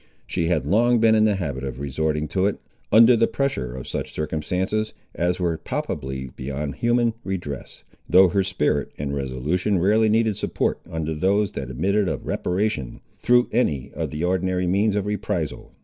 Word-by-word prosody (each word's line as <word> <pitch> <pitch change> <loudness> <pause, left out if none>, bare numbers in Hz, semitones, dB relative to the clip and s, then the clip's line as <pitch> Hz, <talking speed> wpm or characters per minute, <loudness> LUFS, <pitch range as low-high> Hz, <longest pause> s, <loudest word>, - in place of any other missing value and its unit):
She 85 - -1
had 85 -3 +1
long 120 +4 +3
been 110 0 +5
in 110 0 +4
the 105 -2 +3
habit 70 -8 -3
of 65 -2 -5
resorting 75 +2 -1
to 95 +4 +1
it, 100 - -1 0.3
under 115 +3 +7
the 115 - +3
pressure 65 - -2
of 65 - -7
such - - -4
circumstances 90 +8 -2 0.2
as 90 +1 0
were 85 -3 0
palpably 65 -2 -4
beyond 70 +2 -4
human 120 -1 +2
redress, 85 -8 -5 0.3
though 95 0 +7
her 95 +3 +2
spirit 90 -6 0
and 70 -1 -3
resolution 70 +9 -1
rarely 105 +5 +3
needed 110 -1 +2
support - - -1
under 80 -2 -3
those 100 +6 +1
that 65 -2 -5
admitted 95 +10 +1
of - - -4
reparation 90 - -2 0.2
through 125 0 +4
any 75 - 0
of - - -3
the 75 +2 -4
ordinary 90 0 0
means 100 +4 +2
of 100 -1 0
reprisal. 105 -6 -3
90 Hz, 170 wpm, -23 LUFS, 75-105 Hz, 0.3 s, under